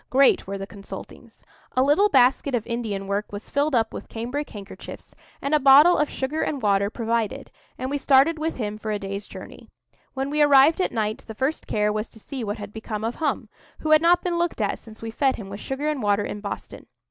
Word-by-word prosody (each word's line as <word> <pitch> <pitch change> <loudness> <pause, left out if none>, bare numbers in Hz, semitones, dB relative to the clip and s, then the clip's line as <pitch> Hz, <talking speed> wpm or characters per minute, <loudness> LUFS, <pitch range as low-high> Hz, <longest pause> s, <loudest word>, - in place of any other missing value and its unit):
Great 270 -5 +4
were 195 0 -4
the 195 - -5
consultings. 200 0 -11 0.3
A 255 - +5
little 305 +10 +4
basket 265 -1 +3
of 225 - -2
Indian 225 -5 -3
work 200 +2 -2
was 205 +1 -8
filled 285 0 +1
up 225 -1 +1
with - - -8
cambric 250 +6 -4
handkerchiefs, 200 -1 -10 0.3
and 280 - -1
a 305 - +5
bottle 285 +5 +7
of 300 - +1
sugar 280 +4 -2
and 285 - -1
water 200 -3 +2
provided, 230 +3 -2 0.3
and 260 +1 -4
we 285 - -1
started 280 +4 +4
with 320 +1 -2
him 215 -3 -4
for 215 - -5
a 210 - 0
day's 200 0 -5
journey. - - -11 0.5
When 270 +1 -2
we 300 0 +1
arrived 290 +4 +6
at - - 0
night 215 -1 -1
the 220 - -8
first 270 +7 -2
care 210 0 +1
was 215 +1 -3
to 220 - -14
see 260 +2 -6
what 205 -1 -3
had 205 0 -8
become 220 -1 -5
of 230 +2 -1
Hum, 310 - -1 0.3
who 310 - -1
had 310 0 +7
not 350 +1 +4
been 345 -1 -1
looked 345 -5 -1
at 205 -2 -1
since 220 0 -13
we 225 - -4
fed 265 +3 +1
him 200 -3 -8
with 200 - -6
sugar 270 +5 -3
and 300 -3 -1
water 205 -1 +1
in 205 - -5
Boston. 200 - -7
245 Hz, 230 wpm, -24 LUFS, 210-285 Hz, 0.5 s, bottle